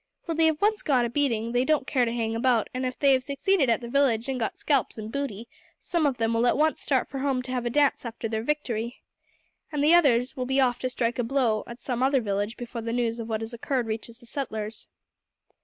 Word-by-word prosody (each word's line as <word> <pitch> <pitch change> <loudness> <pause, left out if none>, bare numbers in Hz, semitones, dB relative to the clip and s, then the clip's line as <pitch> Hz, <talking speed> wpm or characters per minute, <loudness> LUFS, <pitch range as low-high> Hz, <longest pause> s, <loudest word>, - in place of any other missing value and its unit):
When 330 -2 -3
they 325 0 +5
have 315 +3 0
once 425 0 +3
got 255 -5 +2
a 235 - -3
beating 235 -5 0
they 245 +1 +2
don't 300 -1 +1
care 255 -2 +2
to 230 - -2
hang 225 -1 -1
about; 235 -1 +1
and 255 0 -1
if 255 - -5
they 280 -2 +4
have 260 - +3
succeeded 280 +3 +1
at 230 +1 +2
the 235 - -6
village, 240 -3 +2
and 265 -1 -2
got 225 - -2
scalps 275 -6 0
and 215 0 -6
booty, 235 -5 -4 0.3
some 335 -4 0
of 265 -3 -1
them 225 0 0
will 230 +2 +2
at - - +2
once 310 +1 +2
start 265 -3 +1
for 270 - -6
home 265 -2 0
to 255 - -7
have 245 -2 -1
a - - +1
dance 285 +2 +2
after 230 -1 -5
their 220 0 -2
victory, 240 -3 -3 0.7
and 295 -2 -1
the 310 +3 +5
others 265 -7 +4
will 255 -1 -3
be 265 +1 +1
off 250 -2 +2
to 255 - -2
strike 240 -1 -1
a - - +2
blow 235 -3 +1
at 235 - -8
some 250 -2 -3
other 270 +1 +3
village 205 0 -2
before 240 -1 -6
the 230 0 -3
news 235 -1 -1
of 230 0 -5
what 220 -1 -1
has 225 +2 -5
occurred 245 +1 -1
reaches 225 +1 -5
the 245 - -17
settlers." 220 -4 -5
245 Hz, 255 wpm, -26 LUFS, 230-275 Hz, 0.7 s, they